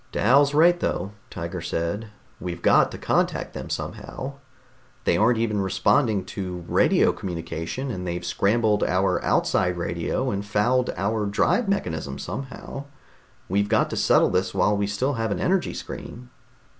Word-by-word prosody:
"Dal's 140 +3 +4
right, 175 +3 +5
though," 100 - -2 0.2
Tiger 85 +1 -5
said. 85 +8 -2 0.3
"We've 85 0 -6
got - - +5
to - - -8
contact - - 0
them - - -6
somehow. 140 +1 -5 0.6
They - - +2
aren't 115 +2 +3
even 105 -3 0
responding 95 +2 +2
to 90 -3 -5
radio - - +4
communication, 85 - -4
and 90 -4 -5
they've 85 0 -3
scrambled 105 0 +2
our 90 -1 +1
outside 90 -1 +1
radio 85 +9 -1
and 100 0 -2
fouled 120 +5 +1
our 105 +2 0
drive 195 - +1
mechanism 80 - -2
somehow. 135 +1 -6 0.6
We've 100 +2 +1
got - - +2
to - - -2
settle - - +4
this 95 +1 0
while 105 +2 +3
we 100 0 0
still 125 +8 0
have 110 - 0
an 100 - -2
energy 185 0 +1
screen." 125 +1 -8
100 Hz, 150 wpm, -24 LUFS, 90-125 Hz, 0.6 s, right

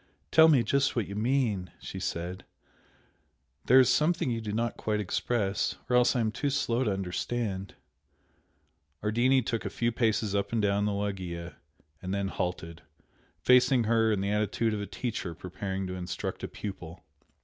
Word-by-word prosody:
"Tell 160 0 +8
me 140 -7 +5
just 140 +5 +1
what 115 -4 0
you 100 - -6
mean," 110 -4 0
she - - -7
said 90 +2 -4 1.2
"There 130 +2 +7
is 130 - +6
something 150 +2 +2
you 115 -1 -2
do 105 -1 -4
not 115 +2 -1
quite 105 -1 -1
express 105 0 -1 0.2
or - - +4
else 125 +1 +4
I 120 - +2
am 110 -1 0
too 130 +6 -1
slow 130 -2 0
to 110 - +1
understand 95 +1 -3 0.7
" 75 +3 -40
Ardini 120 +5 +3
took 115 0 -2
a 100 - -3
few 120 +4 0
paces 110 -3 0
up 100 -1 -1
and 115 - 0
down 100 0 +2
the 105 - +1
loggia 90 -4 -4 0.5
and 95 +2 -3
then 100 -1 -1
halted, 85 -3 -4 0.6
facing 125 +3 +5
her 110 0 +3
in 100 -3 0
the 100 +1 -1
attitude 105 +2 0
of 105 - -2
a 100 - -5
teacher 95 -3 -4
preparing 95 +2 -4
to 90 - -5
instruct 90 -1 -5
a - - -2
pupil. 90 -4 -8
105 Hz, 175 wpm, -29 LUFS, 95-120 Hz, 1.2 s, Tell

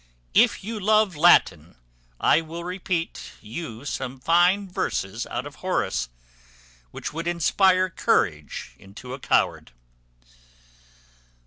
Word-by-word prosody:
If - - +3
you 220 +2 -5
love 215 -2 +3
Latin, 90 - +4 0.4
I 165 - +4
will 165 +1 -8
repeat 180 -2 -4
you 115 +1 -8
some 130 -2 -4
fine 175 +7 +3
lines 100 - -2
out 120 +2 -4
of 145 - -10
Horace, 185 - -1 0.8
which - - -6
would 165 +2 -4
inspire 185 +2 +3
courage 75 - -1
into 110 +6 -10
a 135 - -7
coward. - - 0
165 Hz, 110 wpm, -24 LUFS, 120-185 Hz, 0.8 s, Latin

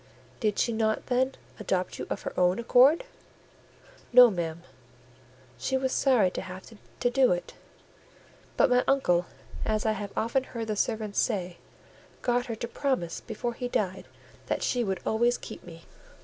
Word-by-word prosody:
"Did 210 -3 0
she 235 - +1
not, 220 -1 0
then, 260 +2 +1 0.2
adopt 185 -3 -2
you - - -5
of - - -4
her - - -4
own 180 0 +3
accord?" 255 - +5 1.1
"No, 245 -1 +9
ma'am; 170 -2 -4 1.0
she 265 - 0
was 260 0 -1
sorry 240 -11 +3
to - - -4
have 185 0 -9 0.4
to 245 - +3
do 265 0 +4
it: 175 - -5 1.0
but 265 - +4
my 250 0 +4
uncle, 180 -11 +2 0.4
as 215 0 -1
I 220 - +3
have 205 -1 -4
often 235 +4 +1
heard 230 -3 -6
the 215 - 0
servants 215 -1 -1
say, 185 -6 -1 0.7
got 245 0 +1
her 230 - -3
to 235 - -5
promise 255 -9 -2
before 235 +2 -4
he 245 +1 -4
died 190 -5 -2 0.4
that - - -1
she 245 -1 +1
would 190 -4 -2
always 240 +2 +2
keep 220 - -10
me." 165 -1 -12
220 Hz, 165 wpm, -28 LUFS, 190-245 Hz, 1.1 s, No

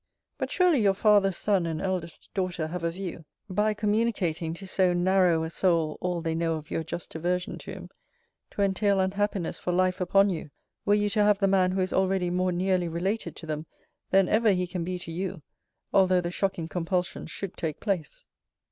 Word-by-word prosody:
But - - -2
surely 355 -8 +3
your 195 -2 +3
father's 200 -2 +4
son 195 -5 +1
and 160 -1 -3
eldest 185 -3 -4
daughter 185 -4 -1
have 170 +2 -5
a 170 - +1
view 175 -1 -6 0.2
(by 210 +2 +1
communicating 205 -7 0
to 195 - -9
so 185 -1 +2
narrow 175 -2 +3
a 160 - -4
soul 165 -4 +1
all 180 -1 -1
they 165 0 -1
know 165 0 0
of 155 -1 -8
your - - -1
just 165 +1 -6
aversion 180 +2 -2
to - - -8
him) - - -9 0.6
to 200 - -1
entail 200 0 +2
unhappiness 190 -1 -1
for 180 - -2
life 185 +1 +1
upon 195 +2 +4
you, 160 -4 -5 0.4
were 205 - +4
you 210 0 +1
to 210 -1 +3
have 205 -1 +4
the 195 -1 +2
man 185 -1 +3
who 190 - 0
is 185 - -1
already 190 -2 +1
more 185 +1 +1
nearly 180 0 +1
related 185 +7 -2
to - - -9
them, 155 0 -4 0.4
than 195 -1 +4
ever 220 +3 +3
he 180 -1 0
can 175 -1 -4
be 180 +1 -3
to 175 -2 -7
you, 180 -1 -4 0.5
although 185 -1 +5
the 175 -1 -3
shocking 185 -3 -1
compulsion 180 +2 -2
should 195 -2 -6
take 155 -3 -3
place. 190 -8 -3
185 Hz, 200 wpm, -27 LUFS, 170-195 Hz, 0.6 s, although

